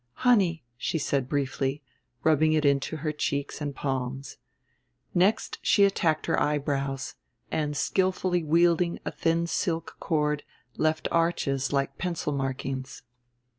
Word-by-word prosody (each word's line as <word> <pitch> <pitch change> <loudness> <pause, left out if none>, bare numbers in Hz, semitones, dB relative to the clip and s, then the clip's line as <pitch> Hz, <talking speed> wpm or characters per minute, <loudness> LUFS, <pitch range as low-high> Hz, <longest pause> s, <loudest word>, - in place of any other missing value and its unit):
"Honey," 190 - +4
she 165 - -1
said 140 -3 -1
briefly, 140 0 -1 0.4
rubbing 155 0 +4
it 155 -1 +2
into 140 +2 +2
her 155 - +1
cheeks 145 -1 -2
and 145 -2 -3
palms. 135 0 -3 0.8
Next 190 +5 +2
she 200 - +4
attacked 170 -5 +2
her - - +1
eyebrows, 140 -2 -1 0.4
and 150 -2 -1
skillfully 185 -1 +1
wielding 170 +2 +3
a - - -2
thin 165 +1 +1
silk 165 0 -2
cord 150 -2 0 0.3
left 155 0 +1
arches 140 -6 +1
like 140 -1 -1
pencil 170 -5 -2
markings. 135 -1 -4
150 Hz, 125 wpm, -27 LUFS, 140-170 Hz, 0.8 s, Honey